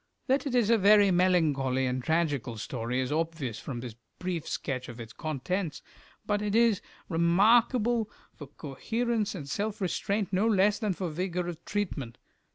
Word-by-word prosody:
That 275 +2 +1
it 255 - -1
is 235 -3 +3
a 230 - +5
very 205 0 +6
melancholy 155 -8 +2
and 125 0 -2
tragical 145 -7 0
story 115 +3 -3
is 130 - -3
obvious 155 -7 -2
from 120 -4 -6
this 120 -2 -7 0.2
brief 180 -3 -3
sketch 130 -3 -3
of 120 0 -9
its 115 -1 -8
contents, 155 +4 -3 0.4
but 205 -1 0
it 210 0 -1
is 230 -3 +4 0.3
remarkable 220 +6 +3 0.2
for 145 - -10
coherence 215 - -2
and 145 -6 -7
self 205 +8 -2
restraint 200 +1 -1
no 195 +4 +3
less 205 -1 +3
than 210 -4 0
for 180 0 -3
vigour 180 +2 -2
of 170 -2 -6
treatment. 165 - -3
180 Hz, 165 wpm, -29 LUFS, 140-210 Hz, 0.4 s, very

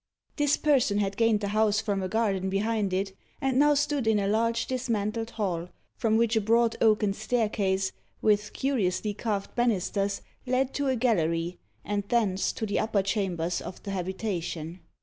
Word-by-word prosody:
This 290 -1 +3
person 265 -9 +2
had 200 -1 0
gained 225 -1 +3
the 200 - -2
house 215 0 +2
from 205 -3 -1
a 185 - -1
garden 195 -3 0
behind 205 0 0
it, 190 +1 -1 0.2
and 265 -1 +1
now 295 0 +5
stood 285 -3 0
in 220 -1 +4
a 200 -1 0
large 230 +2 +1
dismantled 230 -3 -2
hall, 180 -6 -2 0.3
from 220 -1 +2
which 230 0 +2
a 220 - +3
broad 230 +2 +3
oaken 215 -2 +3
staircase, 205 -4 0 0.3
with 210 -1 +2
curiously 210 -6 0
carved 205 -2 -3
banisters, 200 -4 0 0.2
led 255 +1 +1
to 285 -1 -1
a 260 - +2
gallery, 175 -7 0 0.3
and 205 0 -1
thence 210 -6 +1
to 220 - -3
the 205 - 0
upper 210 -3 +1
chambers 180 -4 -1
of 180 - -9
the 200 - -5
habitation. 180 -3 -3
210 Hz, 170 wpm, -28 LUFS, 195-230 Hz, 0.3 s, now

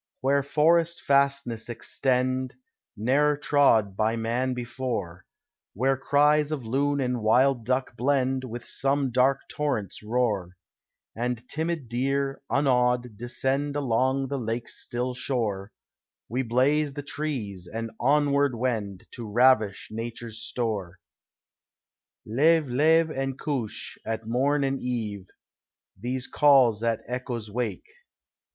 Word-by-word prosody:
Where 140 +2 +3
forest 165 +4 +2
fastnesses 140 -4 +1
extend, 130 +1 -1 0.4
Ne'er 145 +7 +2
trod 115 -9 +3
by 110 +2 +1
man 120 +3 -1
before, 120 -8 -4 0.5
Where 135 +6 +2
cries 150 +2 +3
of 140 -6 -3
loon 140 +4 0
and 125 -2 -1
wild 120 +2 +3
duck 130 -1 0
blend 130 +1 +1
With 120 -1 -7
some 135 -1 0
dark 130 +2 +3
torrent's 140 -10 -3
roar, 105 -6 -1 0.6
And 120 +1 -3
timid 160 -3 -3
deer, 135 +3 -1
unawed, 125 -4 +2
descend 135 +5 -2
Along 135 0 +1
the 140 0 -3
lake's 115 0 -3
still 125 +1 -2
shore, 110 -6 -2 0.6
We 125 +3 -1
blaze 135 +5 +2
the 145 - -5
trees 120 - -4
and 115 0 -4
onward 140 0 +2
wend 110 -6 -2
To 115 -3 -7
ravish 115 -4 +3
nature's 115 0 -6
store. 105 -7 -3 1.3
Leve, 150 +7 +3
leve 160 +5 +3
and 135 -2 -3
couche, 125 -9 -4
at 115 0 -4
morn 140 +5 +1
and 135 0 0
eve 110 -6 -4 0.7
These 125 +5 -3
calls 135 -7 +4
the 115 -1 -1
echoes 120 -3 -4
wake. 120 +1 -3
125 Hz, 120 wpm, -26 LUFS, 115-140 Hz, 1.3 s, calls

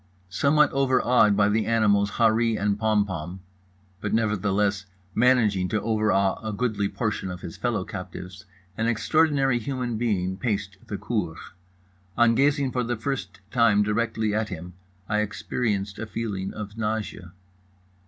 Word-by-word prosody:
Somewhat 150 +8 +3
overawed 125 -6 +3
by 100 -1 +4
the 110 +1 +1
animals 100 -3 +2
Harree 115 -1 +3
and 100 0 0
Pompom 100 -6 0 0.6
(but - - -1
nevertheless 105 -2 0 0.3
managing 110 -6 +3
to 105 - 0
overawe 105 -3 +1
a 110 -1 -4
goodly 105 -3 -1
portion 105 -4 -2
of 90 -1 -7
his 85 -3 -7
fellow 115 -6 -1
captives) 95 0 -8 0.3
an 115 - +1
extraordinary 135 +1 +2
human 125 -2 -3
being 95 -5 0
paced 100 -4 -2
the 100 - -4
cour. 95 -10 -2 0.8
On 120 -1 +5
gazing 140 +1 +2
for 125 -1 -1
the 120 0 -2
first 135 -3 -4
time 115 -5 +4
directly 110 0 0
at 110 0 -1
him 90 0 -7 0.3
I 105 0 +1
experienced 105 -1 -2
a 110 - -4
feeling 105 -4 -3
of 105 +1 -8
nausea. 105 -5 -3
105 Hz, 140 wpm, -25 LUFS, 100-120 Hz, 0.8 s, On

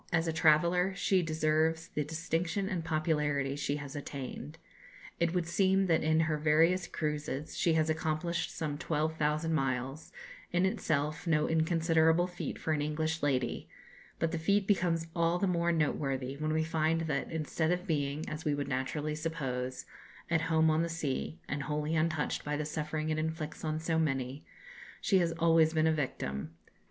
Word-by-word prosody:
As 165 -1 +1
a 165 - 0
traveller 170 +4 +3
she 195 -1 +2
deserves 160 +1 +1
the 150 - -1
distinction 165 +4 -2
and 185 -4 -2
popularity 150 -3 0
she 145 0 -1
has 145 -2 -7
attained. 145 +1 -6 0.6
It 170 -1 +2
would 175 -2 +1
seem 190 +3 +2
that 165 -3 +3
in 160 +1 +3
her 155 -1 0
various 165 +4 +3
cruises 150 -2 -3
she 170 - +2
has 160 -1 +2
accomplished 160 +2 -1
some 150 -3 -4
12,000 155 0 0
miles 135 +1 -2 0.4
in 175 +2 +2
itself 155 -3 -1
no 155 -2 +3
inconsiderable 165 +1 +3
feat 180 0 -5
for 160 - -1
an 150 - 0
English 155 +2 -1
lady; 130 -4 -1 0.5
but 165 - 0
the 170 - -2
feat 200 +5 +2
becomes 175 -5 +1
all 170 0 +2
the 190 - +1
more 170 -2 +1
noteworthy 135 -4 -1
when 155 +2 -2
we 160 0 +2
find 160 0 +1
that, 150 -4 -2
instead 160 0 -1
of 180 +1 -1
being, 150 -3 -1
as 155 +1 -5
we 150 -1 +1
would 145 -1 -3
naturally 145 +3 -2
suppose, 135 -5 -3 0.5
"at 165 -1 +3
home 160 0 +4
on 155 +1 +2
the 170 - -1
sea," 160 -1 -3
and 145 0 -2
wholly 150 +2 -1
untouched 155 -1 0
by 150 0 -2
the 150 - -2
suffering 155 0 -2
it 155 - 0
inflicts 160 -1 -4
on 155 0 -1
so 160 0 0
many, 135 -2 -1 0.6
she 195 - +3
has 170 -2 +1
always 165 -1 +4
been 155 0 +3
a 160 - +4
victim. 80 - -3
160 Hz, 170 wpm, -31 LUFS, 150-165 Hz, 0.6 s, home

